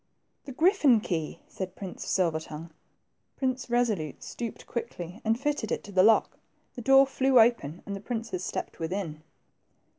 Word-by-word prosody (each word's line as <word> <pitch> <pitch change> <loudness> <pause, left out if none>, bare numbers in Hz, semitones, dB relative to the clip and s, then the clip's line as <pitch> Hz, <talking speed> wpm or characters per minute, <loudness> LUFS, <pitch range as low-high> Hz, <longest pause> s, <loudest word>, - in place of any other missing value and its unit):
The 275 - -7
griffin 300 - +4
key! 165 -6 -3
'' - - -34
said 190 -1 -6
Prince 190 -3 -7
Silver 170 -4 +1
tongue. 160 +1 -9 0.7
Prince 260 -1 -1
Kesolute 225 - 0
stooped 235 -2 -6
quickly 200 -5 -6
and 225 +1 +1
fitted 290 -6 -1
it - - -1
to 205 - -10
the 185 -1 +4
lock. 220 +3 +4 0.3
The 245 - -7
door 270 +2 +7
flew 265 -1 +3
open, 220 -9 +2
and 200 - -4
the - - -6
princes 225 -5 -4
stepped - - -4
within. 165 -2 -3
220 Hz, 160 wpm, -28 LUFS, 180-250 Hz, 0.7 s, door